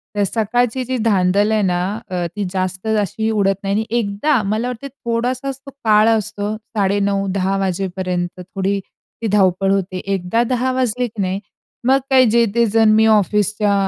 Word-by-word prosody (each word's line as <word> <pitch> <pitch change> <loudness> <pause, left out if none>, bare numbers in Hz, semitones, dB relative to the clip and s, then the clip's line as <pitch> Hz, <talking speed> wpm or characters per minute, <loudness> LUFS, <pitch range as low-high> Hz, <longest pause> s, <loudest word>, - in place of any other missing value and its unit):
तर 205 - +2
सकाळची 235 +5 0
जी 255 +1 -2
धांदल 200 0 +2
आहे 215 -1 +2
ना, 180 -3 +1 0.3
अ, 180 -2 -2
ती 205 -1 -2
जास्त 185 +2 -3
अशी 220 +2 -1
उडत 195 -2 +2
नाही 195 0 -1
आणि 220 +1 0
एकदा 230 +5 +1
मला 215 +4 -1
वाटत 250 +3 -6 0.2
थोडासाच 255 +3 -2
तो 275 - -9
काळ 215 0 +5
असतो 215 -1 -1
9.30-10.00 200 -2 0
वाजेपर्यंत 185 -1 -2
थोडी 195 +2 -2 0.4
ती 225 - -1
धावपळ 195 0 +2
होते 190 -1 -1 0.2
एकदा 190 +6 0
10:00 255 0 0
वाजली 250 -1 0
की 220 -2 -6
नाही 190 0 -1 0.5
मग 265 +1 +5
काही 260 -1 +6
जे, 235 +1 +4
ते 235 0 +4
जण 225 0 +3
मी 220 0 +5
ऑफिसच्या 210 0 +2
210 Hz, 165 wpm, -19 LUFS, 195-230 Hz, 0.5 s, काही